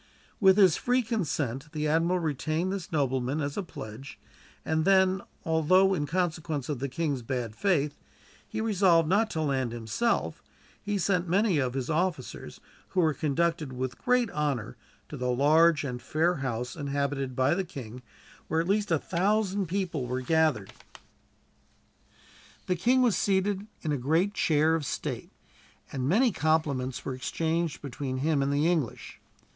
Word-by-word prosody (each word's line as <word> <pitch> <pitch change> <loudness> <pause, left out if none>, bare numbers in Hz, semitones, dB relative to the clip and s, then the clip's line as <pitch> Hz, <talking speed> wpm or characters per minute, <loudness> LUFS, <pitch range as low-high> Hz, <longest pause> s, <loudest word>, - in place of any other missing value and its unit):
With 190 -1 +6
his 190 -6 +6
free 250 +1 +1
consent 150 - -2
the 155 -1 -1
admiral 165 +4 +2
retained 160 +3 -1
this 195 -4 -6
nobleman 135 -2 0
as 145 -1 -2
a - - -1
pledge, 135 - -9 0.5
and 160 0 +1
then 190 +1 +4 0.2
although, 185 +4 +4
in 150 -5 -1
consequence 160 -4 -2
of 145 -4 -2
the 140 +1 -3
king's 140 -1 -2
bad 115 -2 -4
faith, 150 - 0 0.5
he - - -3
resolved 185 -7 +3
not 210 +6 +2
to 160 - -2
land 130 -5 -1
himself, 120 - -1 0.4
he 205 0 -2
sent 180 -1 0
many 195 -2 +2
of 130 -2 -1
his 130 -2 -2
officers, 165 -3 -2 0.3
who 185 - -2
were 160 -3 +3
conducted 155 0 -1
with 130 0 -4
great 250 -3 +2
honor 140 - -2 0.3
to - - -8
the 125 0 -2
large 150 +5 +4
and 125 -3 -4
fair 160 +6 +1
house 125 -2 -3
inhabited 140 -2 -2
by 130 +4 +3
the 190 +2 0
king, 125 -7 -9 0.5
where 160 - 0
at 165 - -1
least 205 +1 +1
a 165 - +3
thousand 195 +3 0
people 170 -7 -2
were 125 +1 -2
gathered. 155 -8 +1 1.9
The 180 - 0
king 250 +9 +3
was 235 -5 +3
seated 195 +1 0 0.2
in 155 - -1
a 145 - +1
great 160 +10 +1
chair 160 -4 +2
of 165 -2 0
state, 135 - -4 0.6
and 130 0 -2
many 235 +7 +4
compliments 145 -6 0
were 135 - -2
exchanged 160 +5 -2
between 135 -1 -4
him 145 +1 +1
and 140 +1 0
the 145 +2 +1
English. 165 -8 -1
155 Hz, 160 wpm, -28 LUFS, 135-185 Hz, 1.9 s, With